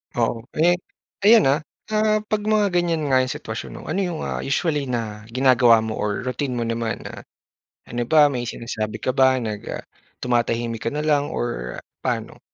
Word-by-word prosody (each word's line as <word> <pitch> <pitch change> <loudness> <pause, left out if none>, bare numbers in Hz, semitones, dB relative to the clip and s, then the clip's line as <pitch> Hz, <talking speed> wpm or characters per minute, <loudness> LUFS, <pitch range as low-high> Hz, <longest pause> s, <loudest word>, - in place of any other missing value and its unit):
Oo. 115 -1 +1 0.2
Eh, 175 +3 +3 0.5
ayan, 225 +1 +8 0.2
ah, - - -12 0.3
ah, 215 0 +3
'pag 215 0 -1
mga 210 -3 +3
ganyan 170 -3 +1
nga 130 - +5
'yong 130 0 0
sitwasyon 110 +3 -6
'no, - - -8
ano 180 +5 0
'yong, 175 -4 -2
ah, - - -3
usually 145 0 0
na 110 -3 -4
ginagawa 120 -2 +5
mo 110 -1 -4
or 105 +3 -1
routine 130 +1 -2
mo 120 - -1
naman 115 0 -2
na, - - -9 0.6
ano 120 - -2
ba, 150 -1 +6
may 120 -2 -3
sinasabi 110 -2 -4
ka - - +2
ba 130 0 +4
nag, 105 -3 -3
ah, - - -5 0.4
tumatahimik 115 -1 0
ka - - +3
na 150 +1 -2
lang 145 -2 +2
or - - -3 0.2
paano? - - -3
130 Hz, 180 wpm, -23 LUFS, 115-155 Hz, 0.6 s, ayan